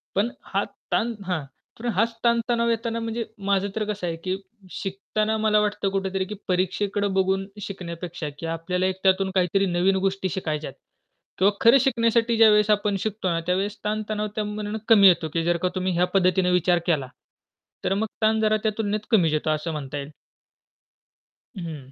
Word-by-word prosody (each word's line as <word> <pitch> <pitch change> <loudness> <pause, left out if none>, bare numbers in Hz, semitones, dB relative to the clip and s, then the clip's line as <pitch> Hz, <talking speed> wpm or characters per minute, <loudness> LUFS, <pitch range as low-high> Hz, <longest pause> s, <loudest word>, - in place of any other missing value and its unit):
पण 210 +5 +2
हा - - -1 0.3
ताण 235 +1 +1
हां, 180 -5 -1 0.4
तर 240 - -8
हाच 225 +5 +1
ताणतणाव 235 0 +2
येताना 230 0 -1
म्हणजे 230 0 -3 0.2
माझं 200 0 +2
तर 220 - 0
कसं 205 -4 -3
आहे, 165 - -2
की 185 +3 -2 0.4
शिकताना 210 +2 -2
मला 215 -1 +3
वाटतं 210 -1 0
कुठेतरी, 190 -1 -1
की 210 +3 -6
परीक्षेकडे 195 +3 0
बघून 190 0 +1
शिकण्यापेक्षा 175 -4 -6
की 165 - -5
आपल्याला 165 +3 -1
एक 185 0 0
त्यातून 190 0 +3
काहीतरी 190 +2 +2
नवीन 180 +2 +2
गोष्टी 195 -1 0
शिकायच्यात 155 -6 -3 0.7
किंवा 195 +2 +5
खरं 235 +4 +7
शिकण्यासाठी 235 -3 +2
ज्यावेळेस 210 -1 +6
आपण 205 -1 +2
शिकतो 205 -2 -2
ना, 165 - 0
त्यावेळेस 195 +3 0
ताणतणाव 215 0 -2
त्यामानाने 210 0 -3
कमी 205 -3 +8
येतो, 170 -3 +3
की 165 -1 0
जर 175 0 +2
का 180 +2 0
तुम्ही 185 0 0
ह्या 175 +1 +3
पद्धतीने 185 -1 +3
विचार 180 0 +3
केला, 150 -6 +1 0.8
तर 195 - +1
मग 210 +3 0 0.2
ताण 220 0 +3
जरा 215 0 +3
त्या 220 - +2
तुलनेत 210 0 0
कमीच 175 -8 +4
येतो 155 +1 0
असं 155 +2 -1
म्हणता 145 -2 -5
येईल. 140 +1 -5 1.5
हं. 155 -7 -7
195 Hz, 170 wpm, -24 LUFS, 180-215 Hz, 1.5 s, कमी